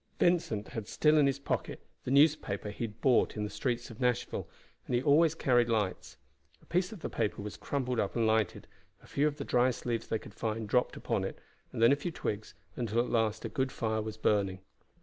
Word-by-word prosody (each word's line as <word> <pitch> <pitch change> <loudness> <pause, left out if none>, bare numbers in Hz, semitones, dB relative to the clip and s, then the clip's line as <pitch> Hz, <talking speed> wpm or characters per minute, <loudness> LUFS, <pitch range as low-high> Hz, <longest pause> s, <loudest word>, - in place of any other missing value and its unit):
Vincent 160 - +1
had 110 -2 -5
still 155 0 +3
in 145 - +5
his 135 0 +1
pocket 140 - -3 0.3
the - - -3
newspaper 140 -8 +3
he 115 - -3
had 105 0 -10
bought 125 -4 +3
in 105 - -1
the 105 - -4
streets 120 +1 -2
of 115 - -12
Nashville, 125 -2 -1 0.4
and 125 - 0
he 120 - +2
always 155 +2 +5
carried 120 -6 +3
lights. 100 - -1 0.4
A - - -23
piece 180 +3 0
of 210 -6 -9
the - - -2
paper 105 -3 -2
was 105 - -6
crumpled 125 -4 -2
up 100 - -1
and 115 -1 +2
lighted, 110 -3 +1 0.4
a - - -15
few 145 +2 +1
of 150 -1 -3
the 140 - -5
driest 125 0 +1
leaves 115 -2 -1
they 110 - 0
could 105 - -12
find 110 0 -3
dropped 125 +4 +1
upon - - -1
it, - - -4 0.3
then 115 +2 +4
a - - +6
few 145 +5 -4
twigs, 110 -9 -4 0.2
until 115 -2 -2
at 120 - 0
last 110 -2 +1
a - - 0
good 130 -3 -1
fire 110 -3 -1
was 110 0 -6
burning. 95 -3 +1
120 Hz, 220 wpm, -31 LUFS, 110-140 Hz, 0.4 s, a